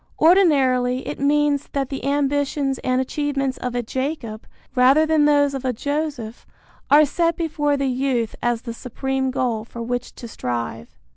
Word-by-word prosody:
Ordinarily 265 -8 +3
it - - -5
means 290 0 +1
that 275 -2 -1
the 270 - -5
ambitions 280 -1 0
and 255 0 0
achievements 275 0 -2
of 250 -1 -4
a 245 - -1
Jacob, 260 -3 -4 0.3
rather 265 +5 +5
than 315 -2 +3
those 285 -1 +3
of 270 -1 -4
a 255 -1 0
Joseph, 285 -3 -4 0.4
are 300 +1 +7
set 335 +3 0
before 295 -3 0
the 275 - -1
youth 255 -3 -1
as 240 -1 0
the 235 - -5
supreme 265 +2 -3
goal 245 -4 -1
for 230 +1 -8
which 245 +1 -4
to 235 - -9
strive. 120 - -5
270 Hz, 160 wpm, -22 LUFS, 245-290 Hz, 0.4 s, are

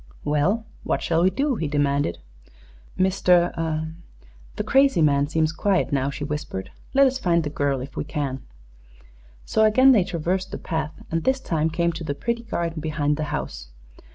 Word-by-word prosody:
"Well, 180 +10 +1 0.2
what - - -1
shall 165 0 +1
we 185 - +5
do?" 275 +3 0
he 160 - -2
demanded. 145 - 0 0.8
"Mr. 175 -4 +2 0.6
the - - -2
crazy 270 -6 +4
man 140 -1 +3
seems 160 0 +1
quiet 190 +2 0
now," 135 0 +1
she 140 - -5
whispered. 145 -10 -4 0.2
"Let 275 0 +7
us 265 0 +1
find 170 -6 +2
the 150 - -4
girl, 140 -3 0
if 130 0 -8
we - - -2
can." 145 -3 -3 1.0
So 220 - +2
again 255 +5 +6
they 215 -7 +5
traversed 180 +1 -2
the 195 - -5
path 160 -2 -3 0.2
and 165 0 -1
this 265 0 +2
time 160 -10 0
came 170 +1 0
to 165 +1 -7
the 145 -3 -3
pretty 235 +8 -2
garden 170 -8 -3
behind 150 -1 0
the 155 - -2
house. - - -5
165 Hz, 175 wpm, -24 LUFS, 145-190 Hz, 1.0 s, Let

